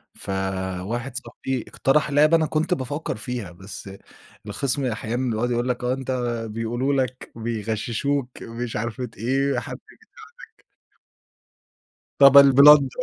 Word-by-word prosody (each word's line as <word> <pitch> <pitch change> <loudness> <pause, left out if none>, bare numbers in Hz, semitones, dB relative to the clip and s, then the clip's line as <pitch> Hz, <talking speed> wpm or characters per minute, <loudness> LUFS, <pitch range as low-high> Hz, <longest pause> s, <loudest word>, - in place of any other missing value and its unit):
فواحد 95 +5 -4
صاحبي 125 +1 -4
اقترح 150 +2 +1
لعبة 155 +3 +5
أنا 160 - +1
كنت 160 +4 0
بافكّر 145 0 -4
فيها، 120 -4 -5
بس 95 +2 -10 0.6
الخِصم 140 0 -2
أحيانًا 120 +2 -2
بيقعد 115 +3 -1
يقول 120 +1 -1
لك 125 - -2
آه 125 +1 +1
أنت 130 0 -4 0.4
بيقولوا 120 +5 -2
لك، 130 -1 -2
بيغششوك، 115 +4 -2
مش 115 +1 -6
عارفة 120 +2 -4
إيه، 135 +3 0
حد - - -7 0.7
بيساعدك. 445 - -31 1.6
طب 140 0 +8
الBlender. 140 +1 +8
125 Hz, 120 wpm, -23 LUFS, 115-140 Hz, 1.6 s, طب